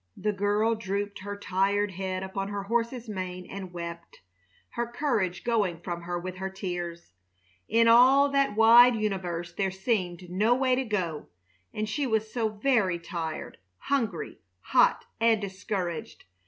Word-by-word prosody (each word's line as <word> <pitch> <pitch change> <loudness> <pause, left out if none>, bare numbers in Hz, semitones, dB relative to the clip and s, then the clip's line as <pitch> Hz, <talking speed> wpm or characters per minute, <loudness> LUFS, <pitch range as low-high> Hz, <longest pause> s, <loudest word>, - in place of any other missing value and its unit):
The 210 -1 -1
girl 205 +3 +1
drooped 200 -1 -3
her 205 +1 -6
tired 200 +1 0
head 185 0 -3
upon 195 +1 -4
her 200 -1 -4
horse's 235 +3 -1
mane 185 -3 -5
and 190 -2 -7
wept, 170 -1 -8 0.5
her 235 0 -3
courage 235 - -1
going 205 -8 0
from 175 -1 -5
her 175 +1 -3
with 185 +1 -6
her 190 +1 -3
tears. 175 - -5 0.6
In 230 0 +4
all 260 +5 +7
that 275 -5 +1
wide 235 +2 +8
universe 185 -5 -3
there 195 -1 0
seemed 185 -3 -2
no 210 +7 +2
way 260 0 +2
to 260 +1 +1
go, 180 -9 -2 0.4
and 215 0 -3
she 275 +6 -1
was 220 -2 -1
so 230 -3 0
very 215 -4 +1
tired, 165 -2 -5 0.2
hungry, 225 - -2 0.2
hot, - - +3
and 225 -1 +4
discouraged! 190 -3 -4
200 Hz, 150 wpm, -28 LUFS, 185-230 Hz, 0.6 s, wide